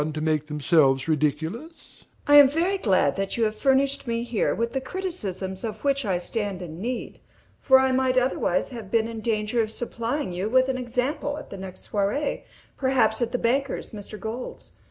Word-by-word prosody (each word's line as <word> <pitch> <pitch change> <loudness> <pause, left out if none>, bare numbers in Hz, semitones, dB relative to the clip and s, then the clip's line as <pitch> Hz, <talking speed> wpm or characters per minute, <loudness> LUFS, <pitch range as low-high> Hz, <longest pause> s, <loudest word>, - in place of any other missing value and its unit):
I - - +2
am 155 +1 -4 2.4
very 350 +7 0
glad 185 - +2
that 195 +3 -2
you 230 - +2
have 215 -1 0
furnished 275 +2 +1
me 230 0 -1
here 235 -3 0
with 235 0 -2
the 265 - -1
criticisms 200 - -4
of 220 -2 -5
which 275 -2 +1
I 190 -3 +1
stand 195 0 -3
in 165 0 -8
need; 245 +3 -4 0.4
for 265 - +6
I 265 0 +3
might 260 0 +2
otherwise 250 -8 +1
have 230 -7 -8
been 225 0 +2
in 225 -1 -6
danger 220 +1 0
of 215 - -2
supplying 235 +1 -3
you 185 +4 -2
with 260 +2 +3
an 260 - 0
example 255 +4 -2
at 300 - -10
the 195 - -6
next 190 -1 -9
soirée, 210 +9 0 0.4
perhaps 260 -4 +2
at 235 0 0
the 250 - 0
banker's, 265 +3 -1
Mr. 210 -1 -8
Gold's. 230 +3 -6
235 Hz, 175 wpm, -25 LUFS, 205-265 Hz, 2.4 s, for